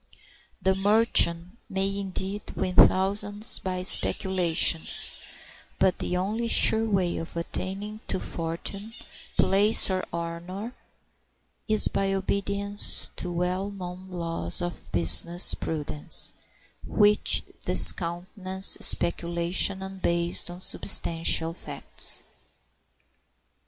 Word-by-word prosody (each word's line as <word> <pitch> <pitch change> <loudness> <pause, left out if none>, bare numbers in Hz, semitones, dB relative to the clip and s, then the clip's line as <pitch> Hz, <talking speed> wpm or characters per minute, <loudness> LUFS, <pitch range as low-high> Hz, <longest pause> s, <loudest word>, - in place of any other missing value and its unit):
The 190 - -1
merchant 195 -2 +3
may, 195 +1 -3
indeed, 195 +1 -6
win 185 - -4
thousands 205 +4 +2
by 185 -1 -6
speculations; 180 -3 +1 0.4
but 190 -2 -1
the 180 - -4
only 215 +6 -4
sure 225 -1 +3
way 185 -4 -2
of 165 +1 -9
attaining 195 +5 -7
to - - -3
fortune, 180 +7 -6 0.4
place, 205 +1 +2
or 185 0 -3
honor 170 +7 -8 0.9
is 215 -1 +2
by 195 0 -3
obedience 200 +1 -2
to 180 - -6
well 180 +3 -4
known 185 -1 -11
laws 170 -2 -3
of 175 -1 -8
business 85 - +4
prudence, 150 0 +2 0.5
which 210 0 +1 0.2
discountenance 185 +2 +4
speculation 170 +3 +1
unbased 175 -3 -3
on 175 +1 -11
substantial 165 -3 +1
facts. - - -4
185 Hz, 95 wpm, -24 LUFS, 170-200 Hz, 0.9 s, business